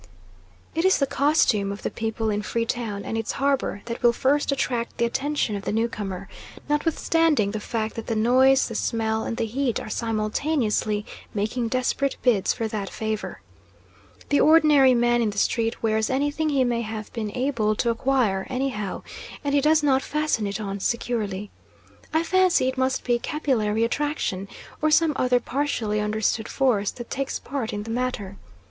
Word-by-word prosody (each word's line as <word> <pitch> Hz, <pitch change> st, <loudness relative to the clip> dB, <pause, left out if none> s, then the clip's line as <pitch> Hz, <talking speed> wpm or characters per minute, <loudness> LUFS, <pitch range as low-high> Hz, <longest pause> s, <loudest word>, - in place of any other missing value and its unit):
It 330 Hz, -, 0 dB
is 375 Hz, 0 st, +4 dB
the 275 Hz, -, +2 dB
costume 265 Hz, -9 st, +2 dB
of 200 Hz, -, -7 dB
the -, -, -2 dB
people 225 Hz, 0 st, -2 dB
in 205 Hz, 0 st, -1 dB
Free 230 Hz, +2 st, -1 dB
Town 220 Hz, -4 st, -3 dB
and -, -, -3 dB
its 225 Hz, -1 st, -2 dB
harbour 275 Hz, -7 st, 0 dB
that 235 Hz, 0 st, -5 dB
will 240 Hz, -1 st, +5 dB
first 280 Hz, +4 st, +1 dB
attract 245 Hz, -4 st, -2 dB
the 235 Hz, -, +2 dB
attention 270 Hz, -2 st, -1 dB
of 200 Hz, -, -5 dB
the -, -, -2 dB
newcomer, 210 Hz, -4 st, -2 dB, 0.4 s
notwithstanding 300 Hz, -5 st, +2 dB
the 215 Hz, -, -3 dB
fact 220 Hz, +1 st, -3 dB
that 225 Hz, -, -6 dB
the 230 Hz, -, -1 dB
noise, 260 Hz, +4 st, +4 dB
the 230 Hz, -, -6 dB
smell, 220 Hz, 0 st, -1 dB
and 230 Hz, -, -3 dB
the 230 Hz, -, 0 dB
heat 245 Hz, +2 st, -1 dB
are -, -, -7 dB
simultaneously 215 Hz, -1 st, 0 dB, 0.3 s
making 220 Hz, +4 st, -1 dB
desperate 255 Hz, +3 st, 0 dB
bids 225 Hz, -7 st, +3 dB
for 225 Hz, -2 st, -2 dB
that 210 Hz, -3 st, -4 dB
favour. 220 Hz, -1 st, -4 dB, 0.9 s
The 285 Hz, -, +3 dB
ordinary 300 Hz, -5 st, +6 dB
man 240 Hz, 0 st, +3 dB
in 225 Hz, -, +1 dB
the 205 Hz, -, -7 dB
street 230 Hz, +2 st, 0 dB
wears 220 Hz, -1 st, +1 dB
anything 290 Hz, +4 st, 0 dB
he 275 Hz, -3 st, +2 dB
may 240 Hz, -2 st, 0 dB
have 220 Hz, -1 st, -6 dB
been 215 Hz, -3 st, -3 dB
able 235 Hz, -5 st, +1 dB
to 235 Hz, +2 st, +1 dB
acquire, 230 Hz, -5 st, +1 dB
anyhow, 255 Hz, -7 st, -3 dB, 0.4 s
and 285 Hz, -1 st, -1 dB
he 285 Hz, -, +4 dB
does 305 Hz, +1 st, +3 dB
not 270 Hz, -2 st, +3 dB
fasten 300 Hz, -9 st, -1 dB
it 200 Hz, +2 st, -3 dB
on 200 Hz, -2 st, -4 dB
securely. 210 Hz, -3 st, -2 dB, 0.6 s
I 320 Hz, +1 st, +2 dB
fancy 370 Hz, -6 st, +3 dB
it 260 Hz, -, -1 dB
must 260 Hz, 0 st, 0 dB
be 240 Hz, -1 st, +1 dB
capillary 230 Hz, -8 st, 0 dB
attraction, 235 Hz, -7 st, -1 dB, 0.3 s
or 310 Hz, -, +3 dB
some 310 Hz, 0 st, +4 dB
other 250 Hz, -1 st, +2 dB
partially 240 Hz, -5 st, -1 dB
understood 215 Hz, +1 st, 0 dB
force, 235 Hz, -7 st, +1 dB
that 240 Hz, -1 st, -9 dB
takes 275 Hz, 0 st, -2 dB
part 270 Hz, -5 st, -4 dB
in 205 Hz, 0 st, -4 dB
the 225 Hz, -, -6 dB
matter. 225 Hz, -5 st, -3 dB
235 Hz, 175 wpm, -24 LUFS, 215-275 Hz, 0.9 s, ordinary